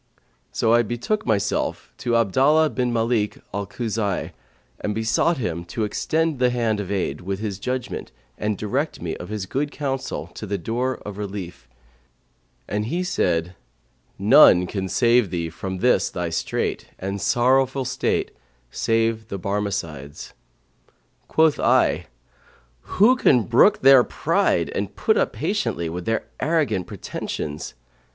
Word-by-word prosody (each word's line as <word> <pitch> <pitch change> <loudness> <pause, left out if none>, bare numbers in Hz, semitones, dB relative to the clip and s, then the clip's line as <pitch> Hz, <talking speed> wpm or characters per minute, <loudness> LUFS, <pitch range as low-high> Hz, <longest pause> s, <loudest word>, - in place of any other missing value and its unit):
So 115 0 +2
I 120 - +6
betook 120 - -2
myself 105 -2 -1
to 120 -1 0
Abdallah 135 +8 +3
bin 125 +1 -1
Mαlik 115 -2 0
al 100 0 -3
Khuza'ν[FN#136] 105 -3 -2 0.5
and 105 - -2
besought 110 +9 +1
him 85 -9 -3
to 110 +6 -3
extend 160 +7 0
the 125 -1 +4
hand 115 -3 0
of 100 - -4
aid 95 -7 -2
with 95 +2 -3
his 105 -2 -4
judgement 125 - -4 0.2
and 105 -1 -2
direct 130 +10 -2
me 85 -2 -4
of 90 - -9
his 105 -3 -3
good 140 +8 -2
counsel 135 -3 -3
to 105 - -7
the 100 +1 -1
door 120 +7 -2
of 105 -1 -7
relief; 95 -9 -6 1.0
and 105 +2 -2
he 175 +7 -1
said, 90 - 0 0.6
None 90 +1 +7
can 95 0 -4
save 120 +1 +3
thee 85 -2 -3
from 95 +3 -5
this 125 +7 +2
thy 90 -2 -3
strait 85 - -2
and 100 +1 -4
sorrowful 130 +2 +2
state - - -1 0.4
save 115 -1 0
the 100 - -5
Barmecides.' 95 -8 -4 0.9
Quoth 160 -2 +3
I, - - +2 0.9
Who 220 +7 +6
can 125 - +4
brook 130 - +4
their 135 -2 +8
pride - - 0
and - - -3
put - - +2
up - - +1
patiently 85 -1 -1
with 85 +2 -5
their 115 0 -1
arrogant 150 - 0
pretensions?' 75 0 -5
110 Hz, 140 wpm, -23 LUFS, 95-125 Hz, 1.0 s, their